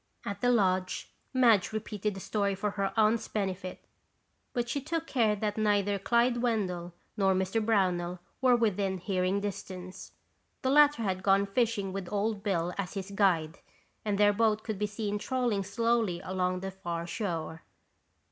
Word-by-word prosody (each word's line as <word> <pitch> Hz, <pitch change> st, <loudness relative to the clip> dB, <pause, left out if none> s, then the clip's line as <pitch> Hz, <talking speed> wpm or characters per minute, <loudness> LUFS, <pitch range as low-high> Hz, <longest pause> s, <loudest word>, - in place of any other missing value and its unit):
At 200 Hz, -, -4 dB
the 245 Hz, -, +3 dB
lodge, 185 Hz, -5 st, +1 dB, 0.2 s
Madge 235 Hz, -7 st, +4 dB
repeated 210 Hz, -1 st, -3 dB
the -, -, -6 dB
story 200 Hz, 0 st, -1 dB
for 205 Hz, +2 st, -2 dB
her 200 Hz, -1 st, -1 dB
aunt's 220 Hz, +1 st, +3 dB
benefit 185 Hz, -3 st, -4 dB, 0.7 s
but 240 Hz, -1 st, -1 dB
she 280 Hz, +4 st, -2 dB
took 325 Hz, +3 st, -2 dB
care 225 Hz, -8 st, +2 dB
that 210 Hz, +1 st, -2 dB
neither 205 Hz, -1 st, +2 dB
Clyde 235 Hz, +4 st, +2 dB
Wendell 185 Hz, -8 st, -1 dB, 0.2 s
nor 195 Hz, -3 st, +3 dB
Mr. 190 Hz, +4 st, 0 dB
Brownell 180 Hz, -5 st, +1 dB, 0.2 s
were 255 Hz, -2 st, +5 dB
within 200 Hz, -4 st, +1 dB
hearing 185 Hz, +1 st, 0 dB
distance. 185 Hz, -2 st, -6 dB, 0.5 s
The 260 Hz, -, +2 dB
latter 295 Hz, -3 st, +5 dB
had 190 Hz, -2 st, -1 dB
gone 195 Hz, +1 st, +4 dB
fishing 200 Hz, -2 st, 0 dB
with 195 Hz, -2 st, -5 dB
Old 210 Hz, 0 st, -1 dB
Bill 180 Hz, -4 st, -1 dB
as 190 Hz, 0 st, -3 dB
his 195 Hz, 0 st, -5 dB
guide, 170 Hz, -6 st, +2 dB, 0.4 s
and 205 Hz, -2 st, 0 dB
their 205 Hz, 0 st, +5 dB
boat 215 Hz, 0 st, +2 dB
could 215 Hz, -4 st, -4 dB
be 210 Hz, -, +1 dB
seen 210 Hz, 0 st, -3 dB
trolling 240 Hz, -3 st, 0 dB
slowly 225 Hz, -2 st, 0 dB
along 185 Hz, -1 st, -1 dB
the 195 Hz, 0 st, -4 dB
far 170 Hz, -3 st, -4 dB
shore. 165 Hz, -4 st, -4 dB
200 Hz, 160 wpm, -30 LUFS, 185-220 Hz, 0.7 s, were